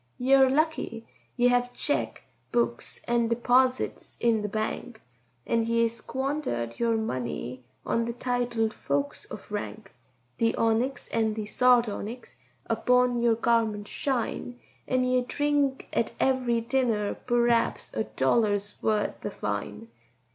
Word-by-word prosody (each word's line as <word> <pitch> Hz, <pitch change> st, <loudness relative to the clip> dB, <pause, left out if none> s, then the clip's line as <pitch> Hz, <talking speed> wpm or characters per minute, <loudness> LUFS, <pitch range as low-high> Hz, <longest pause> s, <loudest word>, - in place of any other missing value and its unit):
"Ye 255 Hz, +2 st, +2 dB
are 265 Hz, -1 st, +7 dB
lucky—ye 260 Hz, -4 st, -1 dB
hev 245 Hz, 0 st, +1 dB
cheque 290 Hz, -, -2 dB, 0.3 s
books 235 Hz, 0 st, -1 dB
and 235 Hz, -1 st, +2 dB
deeposits 250 Hz, +2 st, +1 dB
in 230 Hz, -2 st, +2 dB
the 210 Hz, -, -2 dB
bank, 220 Hz, +2 st, -3 dB, 0.5 s
And 230 Hz, -1 st, +1 dB
ye 230 Hz, 0 st, +2 dB
squanderate 235 Hz, -, -3 dB
your 230 Hz, -1 st, +2 dB
money 125 Hz, -, -4 dB, 0.2 s
on 230 Hz, 0 st, +1 dB
the 235 Hz, -, -3 dB
titled 240 Hz, -3 st, -1 dB
folks 140 Hz, 0 st, -2 dB
of -, -, -9 dB
rank; 210 Hz, 0 st, -5 dB, 0.5 s
The 230 Hz, 0 st, +2 dB
onyx 235 Hz, +3 st, 0 dB
and 220 Hz, -1 st, 0 dB
the 215 Hz, -1 st, -3 dB
sardonyx 235 Hz, 0 st, +1 dB, 0.3 s
upon 245 Hz, +2 st, +2 dB
your 235 Hz, -1 st, +4 dB
garments 225 Hz, -3 st, +1 dB
shine, 245 Hz, -2 st, -2 dB, 0.3 s
An' 255 Hz, 0 st, +2 dB
ye 255 Hz, 0 st, +2 dB
drink 285 Hz, +1 st, 0 dB
at 230 Hz, -, 0 dB
every 250 Hz, -3 st, +2 dB
dinner 230 Hz, -4 st, 0 dB
p'r'aps 240 Hz, -1 st, +1 dB
a 220 Hz, -, 0 dB
dollar's 205 Hz, -, 0 dB
wuth 215 Hz, -1 st, 0 dB
of 205 Hz, -, -6 dB
wine. 105 Hz, +2 st, -3 dB
235 Hz, 125 wpm, -27 LUFS, 215-250 Hz, 0.5 s, are